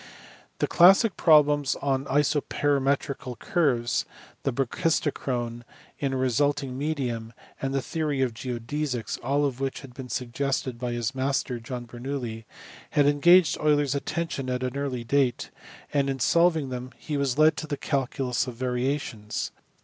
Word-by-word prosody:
The - - +1
classic 195 +4 +6
problems 150 -3 +4
on 135 -1 -1
isoperimetrical 140 -2 0
curves, 125 -9 +1 0.4
the 135 - 0
brachis 135 +6 +1
tochrone 120 -5 -3 0.4
in 140 -2 0
a - - 0
resisting 135 +1 +1
medium, 130 -6 -3 0.3
and 135 - -1
the 135 -1 -1
theory 150 -4 -1
of 125 -3 -1
geodesies 125 +2 -3
(all 145 +2 +1
of 135 -3 -2
which 135 -1 -3
had 135 -3 -12
been 130 0 -8
suggested 130 0 -2
by 120 -1 -2
his 120 +1 -2
master 130 -2 -1
John 120 +1 -6
Ber 120 0 -11
noulli) 120 -4 -4 0.4
had 145 - +3
engaged 165 +4 +5
Euler 150 -1 +3
s 140 -2 -1
attention 145 -2 -3
at 125 0 -1
an 130 +1 -3
early 135 -4 -2
date; 130 0 +1 0.4
and 140 -1 +2
in 135 - -1
solving 160 +1 +3
them 125 0 -5
he 150 - -5
was 140 -2 0
led 155 +1 +5
to 155 - -4
the 145 -2 -3
calculus 135 -3 -1
of 125 - -6
variations. 125 -3 -2
135 Hz, 155 wpm, -26 LUFS, 125-145 Hz, 0.4 s, classic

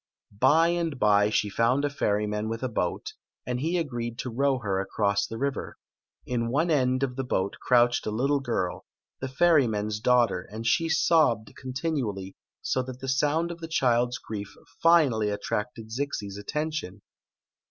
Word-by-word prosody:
By 160 +7 +5
and 170 -4 -1
by 105 0 +4
she 105 - +1
found 115 +7 +1
a - - +1
ferryman 105 -5 -1
with 115 +2 -4
a - - +1
boat, 90 -7 -3 0.3
and 125 0 -2
he 165 +6 0
agreed 120 -7 -3
to 125 - -4
row 135 +3 +1
her 100 -6 -1
across 100 +1 0
the 115 - -6
river. 140 +2 -3 0.5
In 115 -2 -1
one 155 +7 +1
end 130 -2 +2
of 125 -1 -2
the 135 - -1
boat 100 -6 -1
crouched 120 -2 +3
a - - +1
little 135 +7 +1
girl, 115 -9 -3 0.3
the 130 - -3
ferryman's 125 -9 +2
daugh 125 0 +4
ter, 90 - -5
and 110 +2 -6
she 165 +8 +2
sobbed 150 -11 +2
continually, 130 - -3 0.3
so 130 - 0
that 130 0 -8
die 135 - -7
sound 150 +6 +1
of 170 - -8
the 165 - -6
child's 125 -5 +1
grief 100 -2 -7 0.3
finally 140 -11 +4
attracted 110 +2 -4
Zixi's 110 -6 -3
attention. 145 - -4
125 Hz, 165 wpm, -27 LUFS, 105-140 Hz, 0.5 s, By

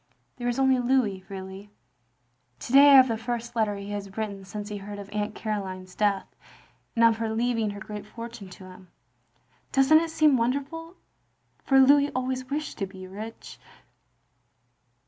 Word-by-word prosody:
There 245 -1 -4
is 245 - -1
only 265 -1 +3
Louis, 240 -7 +1
really. 190 +1 -8 0.9
To 240 - -6
day 280 +1 +9
I 280 - +8
have 260 -1 +8
the 225 -2 -2
first 235 0 -4
letter 215 -3 +1
he 200 +1 -7
has 200 -1 -6
written 205 -3 -4
since 205 +2 -7
he 210 - -5
heard 205 +1 -8
of 200 0 -9
Aunt 210 0 -2
Caroline's 190 -4 -5
death, 200 -2 +1 0.7
and 230 0 +5
of 225 -1 +4
her 225 -1 -2
leaving 230 -1 0
her 205 0 -7
great 210 +1 -8
forttine 230 -3 -9
to - - -13
him. 185 0 -13 0.8
Doesn't 275 +3 +5
it 330 - -3
seem 310 -3 +4
wcaiderful? 280 +8 -2 0.7
For 270 -1 +4
Louis 285 +2 +6
always 255 0 -3
wished 300 -1 -4
to 195 - -2
be 190 -1 -11
rich. 215 +4 -9
225 Hz, 165 wpm, -26 LUFS, 200-260 Hz, 0.9 s, day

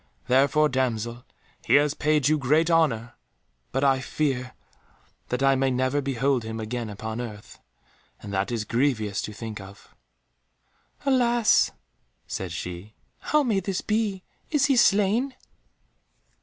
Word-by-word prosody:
Therefore, 140 +4 +4
damsel, 120 -3 -2 0.4
he - - +3
has 145 0 +4
paid 150 -2 +1
you 155 0 +2
great 155 +5 +2
honour. 125 -9 +2 0.6
But 135 +1 -1
I 135 -1 +4
fear 130 -3 -2 0.7
that 125 +2 -1
I 135 0 +5
may 135 0 +1
never 130 +3 0
behold 135 -1 0
him 110 0 -5
again 115 +1 -4
upon 110 +3 -5
earth, 110 -3 -9 0.6
and 100 -1 -8
that 95 +4 -1
is 115 -2 -2
grievous 115 -5 0
to - - -5
think 105 -1 -7
of." 95 +1 -14 1.1
"Alas!" 240 -4 +3 0.6
said 95 -3 -5
she, 90 +5 -7 0.2
"how 300 -1 +2
may 220 -7 +1
this 190 0 -3
be? 210 -3 -1 0.3
Is 295 -3 +2
he 275 -2 +3
slain?" 225 +4 +3
130 Hz, 135 wpm, -25 LUFS, 110-160 Hz, 1.1 s, I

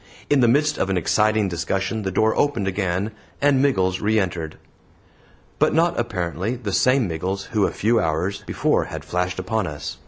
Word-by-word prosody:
In 145 - +5
the 120 - +5
midst 150 +5 +2
of 95 - 0
an 95 - +1
exciting 110 +4 +2
discussion 95 +4 -2
the 95 - -2
door 110 +4 +2
opened 140 -9 +1
again, 95 +1 -1 0.3
and 140 -2 +3
Miggles 95 -10 +1
re 110 +1 +2
entered. 85 -5 -3 1.0
But - - +3
not, 170 -2 +2
apparently, 95 -1 -2
the 110 -6 -5
same 130 -1 +3
Miggles 90 +4 -3
who 105 -3 +2
a - - -3
few 115 +2 +1
hours 90 +4 -1
before - - +1
had 80 -1 -7
flashed 90 +3 -2
upon 95 +2 -1
us. 75 0 -6
100 Hz, 180 wpm, -22 LUFS, 90-115 Hz, 1.0 s, In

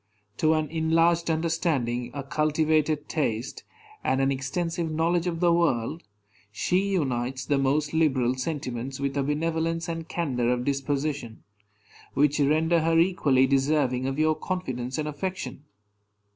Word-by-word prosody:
To 160 0 +3
an 155 -1 0
enlarged 165 +1 +2
understanding, 160 -7 0
a 140 - -4
cultivated 155 +1 +1
taste, 120 -6 -2 0.4
and 130 - +1
an 135 0 +2
extensive 165 +5 -2
knowledge 165 +2 +1
of 165 -1 -2
the 175 -1 +4
world, 160 -3 +1 0.5
she 180 - 0
unites 130 -5 -1
the 145 -2 +1
most 145 +3 +1
liberal 135 -6 +2
sentiments 130 -2 -4
with 140 0 -2
a 140 - +1
benevolence 165 +3 -1
and 165 -1 -5
candor 125 -8 0
of 125 0 -1
disposition, 140 -3 -2 0.7
which 145 +1 +3
render 160 +4 +3
her 165 +1 +2
equally 155 -7 +3
deserving 135 -1 +1
of 135 +1 -2
your 155 0 +3
confidence 130 -9 -4
and 155 -1 -2
affection. 165 -1 -5
150 Hz, 135 wpm, -26 LUFS, 135-165 Hz, 0.7 s, the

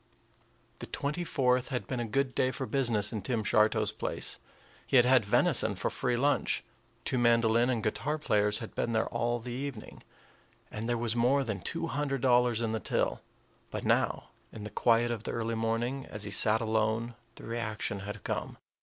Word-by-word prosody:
The - - -7
twenty 150 +5 -2
fourth 130 -6 +1
had 125 -3 -2
been 125 - -3
a 120 - -2
good 130 +4 0
day 130 - +2
for 130 +1 -4
business 120 -7 +1
in 110 - -3
Tim 115 +2 -1
Shartow's 110 +1 +3
place. 110 - -4 0.5
He - - 0
had 120 -2 +7
had 125 -2 +5
venison 105 - +2
for - - -2
free 125 -1 0
lunch; 145 +4 +1 0.4
two 130 - 0
mandolin 115 0 +4
and 115 -4 0
guitar 140 +8 -1
players 105 -8 +1
had 110 - -7
been 115 - -1
there 110 - +1
all 120 +1 -1
the 120 +2 -7
evening; 130 -3 -6 0.7
and 110 +2 -4
there 120 - +1
was 115 -1 -1
more 130 +4 +3
than 110 -6 -4
two 165 - -2
hundred 140 -4 -2
dollars 120 -2 +3
in 115 - 0
the 110 - -1
till. - - -1 0.5
But - - -5
now, - - +1 0.2
in 110 - -8
the 105 - -7
quiet 120 0 +3
of 115 -3 -3
the - - -4
early 115 0 -2
morning, 115 +4 -1
as 105 - -5
he 105 - -3
sat 110 +2 +3
alone, 110 +1 0 0.2
the - - -13
reaction 110 -3 -3
had 105 +2 -7
come. - - -3
115 Hz, 190 wpm, -30 LUFS, 110-130 Hz, 0.7 s, had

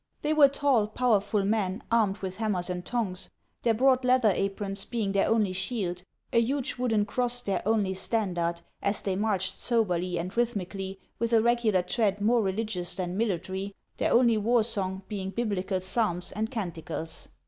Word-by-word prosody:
They 300 +1 +2
were 300 -2 +7
tall, 275 -6 +2
powerful 210 -3 +1
men, 205 -1 0
armed 215 -4 +3
with 185 -1 -4
hammers 195 -5 -1
and 180 0 -4
tongs, 200 -6 -3 0.3
their 230 -2 +2
broad 260 +2 +4
leather 250 -4 +4
aprons 195 +1 -2
being 220 -5 -2
their 195 0 +2
only 215 -4 +2
shield, 185 -2 -2 0.3
a 230 - +5
huge 270 +3 -1
wooden 225 -4 +1
cross 245 +2 -1
their 195 -4 -1
only 210 -4 +2
standard, 180 -4 -1 0.2
as 200 +1 0
they 195 -2 0
marched 190 -2 0
soberly 180 -7 0
and 180 +3 -4
rhythmically, 195 -4 -2 0.2
with 235 0 0
a 225 - +6
regular 235 -6 +2
tread 205 +1 0
more 230 +3 +3
religious 190 -3 -2
than 180 -1 -3
military, 195 -1 -2 0.2
their - - +1
only 235 -2 +5
war 230 +2 +3
song 195 -4 -2
being 195 -3 -4
Biblical 195 -3 -1
psalms 185 -2 -1
and 215 +3 -2
canticles. 170 -7 -5
205 Hz, 165 wpm, -28 LUFS, 190-230 Hz, 0.3 s, were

